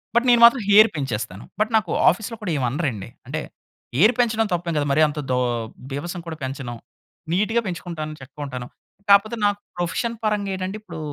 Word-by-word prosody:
But 240 +2 +4
నేను 240 -1 +5
మాత్రం 235 +1 +6
hair 215 +2 +8
పెంచేస్తాను. 115 -8 -4 0.2
But 215 +2 +1
నాకు 205 -6 -2 0.2
ఆఫీస్‌లో 220 +6 -2
కూడా 195 -5 -2
ఏమి 130 - 0
అనరండి. 125 - -3 0.2
అంటే - - -3 0.5
హెయిర్ 210 - +5
పెంచడం 225 -2 +2
తప్పేం 170 -1 -1
కాదు 145 -1 +1
మరి 145 +3 +3
అంత 150 0 -5
దో 125 - +2 0.5
బీభత్సం 170 +6 -4
కూడా 160 -1 -5
పెంచను. 130 -2 -5 0.6
నీట్‌గా 215 +5 +2
పెంచుకుంటాను, 165 -4 -5
చక్కగుంటాను. 130 -2 -7 0.4
కాకపోతే 210 +3 +5
నాకు 205 0 +1 0.2
ప్రొఫెషన్ 220 +7 -1
పరంగా 210 -2 0
ఏటంటే 190 +2 -4
ఇప్పుడు 170 -6 -9
175 Hz, 165 wpm, -23 LUFS, 145-215 Hz, 0.6 s, హెయిర్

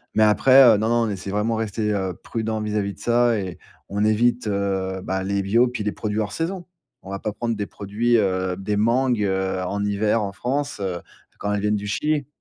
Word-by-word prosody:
mais 110 - +5
après, 130 +6 +6
heu, 115 -4 +7
non, 110 +2 0
non, 120 - +2
on - - -2
essaie 100 -1 -5
vraiment 105 +3 0
rester, 110 -1 -1
heu, 95 -3 -1
prudent 110 +3 -4
vis-à-vis 105 -1 -1
de - - -19
ça 120 -1 +2
et 95 -3 -5 0.3
on 100 +1 -1
évite, 120 +2 +2
heu, 95 -2 -1
bah, 95 0 -2
les 100 +1 0
bio 115 +6 +3
puis 120 -3 -4
les 105 - 0
produits 105 0 -3
hors 105 -2 -2
saison. 175 +2 -3 0.4
On 95 - -12
va 100 - -3
pas 105 - -3
prendre 115 +2 -2
des 105 -1 -3
produits, 110 +5 0
heu, 95 -3 0
des 95 +2 -2
mangues, 120 +1 +2
heu, 95 -1 -1
en 100 +2 -2
hiver, 105 +2 +1
en 100 - -3
France, 140 +6 -3
heu, 90 -3 -3 0.4
quand 100 - -2
elles 105 -1 0
viennent 105 0 +1
du 105 0 -4
Chili 150 +5 -1
105 Hz, 225 wpm, -23 LUFS, 100-115 Hz, 0.4 s, heu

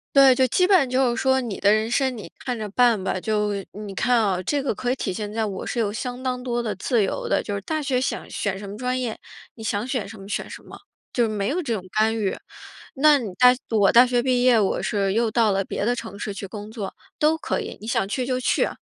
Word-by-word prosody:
对， 275 -1 +8
就 260 +1 +3
基 360 +9 +3
本 390 +1 +5
上 270 -4 0
就 255 -1 +2
是 - - -2
说 265 0 +3
你 235 -6 -4
的 200 - +4
人 215 +1 +2
生 260 0 0
你 210 - -9
看 250 -2 -3
着 215 -1 -4
办 235 -1 +3
吧。 185 - -1
就 210 0 0 0.2
你 205 -1 -7
看 245 +5 +2
啊 195 -5 +1
这 280 +9 -1
个 275 - 0
可 245 +3 -2
以 - - 0
体 190 - -3
现 210 +1 -5
在 220 +1 -1
我 195 -3 -5
是 - - -4
有 210 -3 0
相 250 +3 -5
当 250 -1 -2
多 240 -1 -2
的 215 -3 -2
自 220 +3 +1
由 195 - -3
的。 - - +1
就 205 - -4
是 200 - -3
大 310 +9 -2
学 270 -4 0
想 260 - -3
选 195 -2 -3
什 200 +1 -8
么 200 - -7
专 250 +3 -2
业， 240 -4 -2 0.4
你 225 - -11
想 220 +1 -2
选 250 -7 -2
什 220 - -10
么 195 - -10
选 210 - -3
什 - - -10
么。 - - -12 0.4
就 240 -2 +2
没 205 -1 -1
有 350 +6 -1
这 260 -7 -2
种 190 - -5
干 220 +1 +2
预。 200 -3 -1 0.6
那 290 +1 +5
你 220 -5 -5
大 250 +5 +7 0.2
我 205 -4 +4
大 240 +2 +8
学 245 -1 +1
毕 250 -1 +2
业， 250 -3 +5
我 200 - 0
是 200 -3 0
又 230 +1 +2
到 220 -1 +2
了 195 0 +1
别 200 - -3
的 240 +2 +1
城 230 -4 -7
市 205 0 -4
去 195 0 -6
工 210 +2 -8
作， 215 -4 -6 0.2
都 310 +1 +3
可 - - -2
以， - - -6
你 - - -10
想 195 - 0
去 250 +5 -2
就 255 0 -1
去。 250 - +1
230 Hz, 290 characters per minute, -23 LUFS, 205-255 Hz, 0.6 s, 对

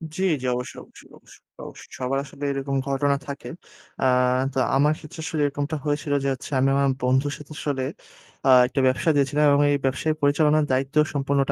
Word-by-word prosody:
জ্বি, 190 - -2 0.2
জ্বি। 130 - -3
অবশ্যই, 125 0 -6
অবশ্যই, - - -18
অবশ্যই, - - -20 0.2
অবশ্যই। - - -13
সবার 130 +1 -1
আসলে 140 +1 -11
এরকম 135 0 -3
ঘটনা 140 +1 +1
থাকে। 140 0 -7 0.5
আ - - +3 0.5
তো 135 - -1 0.2
আমার 150 +3 +3
ক্ষেত্রে 155 +1 -12
আসলে 160 -1 -2
এরকমটা 145 +2 -2
হয়েছিল 145 0 -1
যে 140 - +2 0.3
আমি 135 - +3
আমার 140 0 +2 0.2
বন্ধুর 130 +3 +1
সাথে 150 +1 -13
আসলে 140 -3 -2 0.6
আ - - +5 0.2
একটা 130 +2 -3
ব্যবসা 130 +5 +1
দিয়েছিলাম 145 +2 +2
এবং 140 - +4
এই 145 - +2
ব্যবসায় 135 +4 0
পরিচালনার 150 +1 +3
দায়িত্ব 135 +2 -1 0.2
সম্পূর্ণটা 140 0 0
140 Hz, 175 wpm, -24 LUFS, 135-145 Hz, 0.6 s, আ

